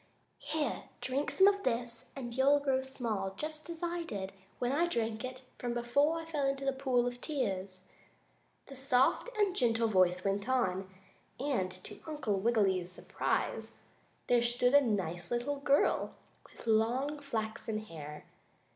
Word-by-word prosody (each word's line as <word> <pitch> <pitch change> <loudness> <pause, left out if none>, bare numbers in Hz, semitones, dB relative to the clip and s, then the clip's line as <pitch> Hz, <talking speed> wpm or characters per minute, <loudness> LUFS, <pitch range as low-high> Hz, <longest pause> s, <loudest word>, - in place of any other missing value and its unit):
"Here, 305 -1 -2
drink 270 +3 -1
some 385 - +5
of 400 0 +3
this 235 -3 -2
and 240 -4 -5
you'll 275 +3 +5
grow 270 -2 +1
small 225 -8 -2
just 310 +2 -5
as 335 0 -6
I 345 0 -1
did 200 - -4 0.3
when 245 0 0
I 330 +5 +2
drank 225 -8 -1 0.4
from 240 -1 -2
it - - -6
before 285 +7 +2
I 325 - -7
fell 300 -4 0
into 275 0 -1
the 270 - +2
pool 260 -2 +1
of 245 0 -4
tears," 190 - -3 0.8
the 275 - -10
soft 265 - +3
and 400 -3 +2
gentle 230 -4 +3
voice 185 -3 +3
went 200 +4 0
on, 190 -7 +1 0.5
and 255 -9 0
to - - -10
Uncle 260 -11 -1
Wiggily's 195 -5 +2
surprise, - - -2 0.5
there 245 -1 +4
stood 245 +2 +3
a 285 - +8
nice 180 - -1
little 245 +4 -1
girl 280 0 +2 0.3
with - - -15
long, 240 +7 +2
flaxen 220 -5 -3
hair. 150 -5 -8
245 Hz, 155 wpm, -33 LUFS, 215-280 Hz, 0.8 s, a